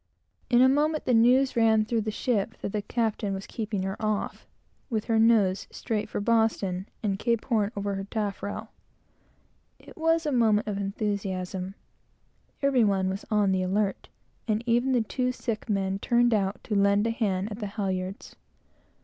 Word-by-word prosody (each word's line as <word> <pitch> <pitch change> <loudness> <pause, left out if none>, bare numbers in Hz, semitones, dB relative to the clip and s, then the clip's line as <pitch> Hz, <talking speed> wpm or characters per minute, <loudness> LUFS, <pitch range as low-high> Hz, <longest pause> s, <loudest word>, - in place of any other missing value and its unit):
In 245 0 +5
a - - +7
moment, 300 +3 +1
the 250 - +2
news 250 +4 +4
ran 220 -2 +4
through 225 0 0
the 215 - -3
ship 215 -1 -1
that - - -3
the 210 - -1
captain 215 -2 -1
was 195 - -6
keeping 210 -4 -3
her 190 +1 -2
off, 215 -1 -2 0.4
with 220 -4 -1
her 225 -2 +2
nose 215 -4 +3
straight 215 -2 -3
for - - -3
Boston, 205 -4 +1
and 195 -2 -1
Cape 235 -1 0
Horn 215 -4 +1
over 200 0 -2
her 195 0 -4
taffrail. 205 -1 -4 1.1
It - - -15
was 325 0 +1
a 300 - 0
moment 220 -4 +3
of 205 -2 -2
enthusiasm. 195 -2 -3 0.9
Every 270 -4 +4
one 195 -2 +2
was 195 +2 -5
on 210 -3 +2
the 190 -1 +1
alert, 195 +2 -1 0.4
and 215 +1 0
even 240 +2 +2
the 240 -3 +3
two 250 +3 -1
sick 230 -3 -4
men 195 -1 0
turned 240 +2 +3
out 195 -1 0
to 215 - -4
lend 200 +1 +3
a 230 - +1
hand 205 -3 -1
at 205 - -6
the 210 - -3
halyards. 190 -2 -4
215 Hz, 175 wpm, -27 LUFS, 195-235 Hz, 1.1 s, a